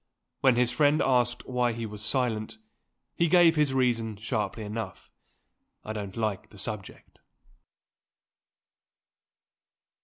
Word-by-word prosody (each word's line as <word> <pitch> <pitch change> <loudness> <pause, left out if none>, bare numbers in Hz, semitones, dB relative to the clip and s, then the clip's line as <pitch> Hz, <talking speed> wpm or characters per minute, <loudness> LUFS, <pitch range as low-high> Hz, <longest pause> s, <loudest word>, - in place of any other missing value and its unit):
When 130 -3 +4
his 125 0 +2
friend 145 +4 +3
asked 120 -2 +1
why 125 -2 +1
he 115 0 -4
was 105 -1 -7
silent, 120 - -1 0.6
he 170 - +2
gave 170 -1 +6
his 150 -3 +2
reason 120 -4 +1
sharply 105 0 -3
enough: 105 -2 -6 0.7
"I 110 - -4
don't 100 -2 -6
like 105 -1 -2
the 105 - -16
subject." 100 -1 -7
115 Hz, 115 wpm, -28 LUFS, 105-130 Hz, 0.7 s, gave